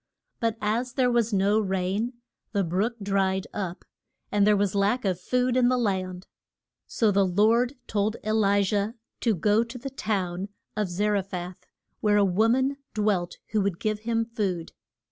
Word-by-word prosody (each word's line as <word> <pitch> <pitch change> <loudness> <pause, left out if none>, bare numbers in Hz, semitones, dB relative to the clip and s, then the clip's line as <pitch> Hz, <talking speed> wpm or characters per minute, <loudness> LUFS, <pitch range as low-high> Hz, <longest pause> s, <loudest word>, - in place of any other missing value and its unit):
But 230 -2 0
as 235 +4 -1
there 250 -2 +2
was 235 -1 +2
no 200 +2 +3
rain, 195 +4 -1 0.4
the 200 -2 +2
brook 190 +8 0
dried 195 -1 +1
up, 185 -3 -4 0.5
and 205 0 +3
there 210 -1 +5
was 200 -1 +1
lack 205 +4 +1
of 185 -2 0
food 250 +4 +1
in 250 -1 +4
the 255 - +2
land. 185 -5 -1 0.6
So 220 -3 +2
the 200 0 +3
Lord 220 +8 +3
told 210 +1 0
E 215 - 0
li 205 -2 +3
jah 205 +2 0 0.3
to 225 -4 +2
go 210 +6 +3
to 235 +2 -8
the 270 +3 -6
town 195 -6 -2 0.3
of 210 -2 0
Za 205 +4 0
re 205 -1 +2
phath, 180 -2 -7 0.3
where 210 -1 +3
a 205 - +5
wo 195 +4 +3
man 260 +4 +2 0.2
dwelt 205 -5 0
who 215 -1 +2
would 195 -3 -1
give 215 -1 -1
him 230 +1 0
food. 195 -7 -3
210 Hz, 180 wpm, -26 LUFS, 190-230 Hz, 0.6 s, there